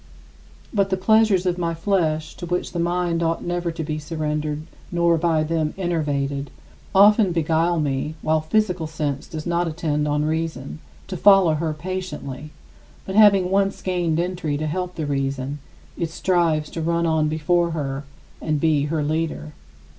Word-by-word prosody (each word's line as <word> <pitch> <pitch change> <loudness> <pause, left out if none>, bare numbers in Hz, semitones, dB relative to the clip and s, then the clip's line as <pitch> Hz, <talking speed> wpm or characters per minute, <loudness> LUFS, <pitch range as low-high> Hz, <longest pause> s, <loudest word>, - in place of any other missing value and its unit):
But 200 -2 +2
the 190 - 0
pleasures 215 -1 +3
of 180 0 0
my 170 -1 -1
flesh 165 -4 0
to 175 - -6
which 180 +1 -2
the 175 - -3
mind 175 0 0
ought 165 0 0
never 175 -1 -2
to 165 0 -5
be 155 0 -3
surrendered 150 -1 -3 0.3
nor 170 -1 +3
by 160 -1 +1
them 155 -1 -1
enervated 145 -6 -1 0.5
often 205 0 +6
beguile 165 +1 +1
me 145 +1 -1
while 155 0 +2
physical 180 -1 0
sense 150 -3 -3
does 155 -1 -6
not 170 0 0
attend 155 -2 -1
on 150 0 +1
reason, 155 -3 -3 0.3
to 190 - -6
follow 195 -3 +6
her 155 +1 -1
patiently, 155 -4 -5 0.6
but 190 - -5
having 200 -3 +5
once 195 0 +1
gained 175 -3 0
entry 175 -4 -2
to 155 - -3
help 180 +3 -3
the 155 - -3
reason, 135 0 -2 0.4
it 170 -2 -2
strives 165 -3 +1
to 165 - -4
run 170 +1 +1
on 160 -2 +2
before 170 +3 +1
her 140 -4 -3 0.4
and 155 -2 0
be 150 -2 +2
her 155 0 -1
leader. 155 - -2
165 Hz, 160 wpm, -22 LUFS, 150-175 Hz, 0.6 s, often